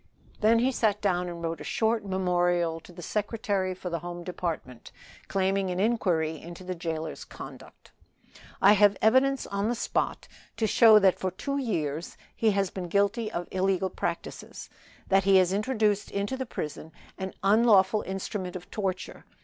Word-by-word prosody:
Then 220 +2 +4
he 250 +3 +2
sat 215 -5 +1
down 180 -3 0
and 170 -1 -7
wrote 165 0 -3
a - - -5
short 225 0 0
memorial 175 -3 +1
to 170 - -15
the 175 0 -10
Secretary 205 -2 -1
for 180 -1 -6
the 170 - -1
Home 175 +1 -7
Department, 165 -9 -5 0.4
claiming 195 0 0
an 180 0 -2
inquiry 175 -8 +1
into 170 +2 -10
the 185 0 -4
jailer's 160 -2 -4
conduct. - - -12 0.7
"I 200 +2 +8
have 205 -1 +4
evidence 260 +4 +3
on 200 +2 -2
the 240 - 0
spot - - -2 0.3
to 225 - +1
show 220 0 +7
that 195 -3 +4
for 185 - -1
two 275 +10 -3
years 165 - -3 0.2
he 225 - +2
has 195 -2 0
been 185 -2 -5
guilty 200 +4 +1
of 175 0 -4
illegal 190 0 0
practices. 170 -1 -5 0.4
That 195 -1 +3
he 195 -1 +6
has 185 0 +3
introduced 210 -1 0
into 200 +6 -2
the 260 -1 -4
prison 155 -4 -6 0.3
an 190 0 -5
unlawful 210 -1 +4
instrument 190 -1 -5
of 180 -1 -9
torture. 190 -3 -4
190 Hz, 165 wpm, -27 LUFS, 175-215 Hz, 0.7 s, I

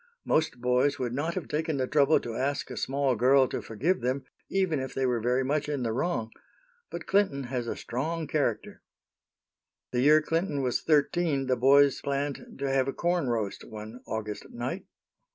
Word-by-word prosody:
Most 155 -5 +1
boys 125 +3 +2
would 125 -3 -2
not 155 +6 -2
have 185 - -4
taken 155 0 -1
the 130 - +1
trouble 145 +2 +4
to 115 - -5
ask 135 +5 -2
a - - -5
small 135 0 0
girl 130 +3 +5
to - - -4
forgive 155 - -1
them, 130 +2 -1 0.2
even 190 -6 +1
if 130 0 -5
they 135 - +1
were 125 -2 +1
very 125 +3 +1
much 150 +2 -1
in 145 -4 -2
the 115 - 0
wrong. 115 -3 -1 0.6
But - - -6
Clinton 190 -9 +2
has 125 -1 -3
a - - -2
strong 160 +7 -3
character." 140 -8 -2 1.1
The 125 - +1
year 150 +3 +6
Clinton 165 -3 -1
was 125 -1 0
thirteen, 150 -1 +2
the 130 -1 +2
boys 140 +2 +5
planned 140 0 -3
to 140 0 -2
have 135 -1 +2
a 135 - -1
corn 175 -6 0
roast, 110 -4 -2
one 110 +3 -9
August 105 -1 -5
night. - - -4
135 Hz, 185 wpm, -28 LUFS, 125-150 Hz, 1.1 s, year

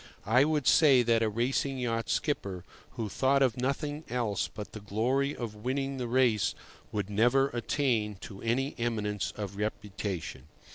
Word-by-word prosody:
I 125 +6 +5
would 150 -3 0
say 140 -5 +6
that 115 -1 +3
a 110 - +2
racing 130 +5 0
yacht 115 -2 -2
skipper 100 - -1 0.3
who 115 -3 -3
thought 135 +6 +2
of 125 -4 +2
nothing 145 +4 -2
else 115 -5 -1
but 105 -2 -8
the 110 - -7
glory 125 +8 0
of 115 -4 -5
winning 135 +5 -2
the 125 -2 -3
race 120 -4 +2 0.4
would 105 -3 -2
never 120 +6 +3
attain 120 -4 0
to 100 -1 -9
any 130 +5 0
eminence 105 -4 -1
of 100 -2 -5
reputation. 100 -3 -4
120 Hz, 155 wpm, -30 LUFS, 105-135 Hz, 0.4 s, say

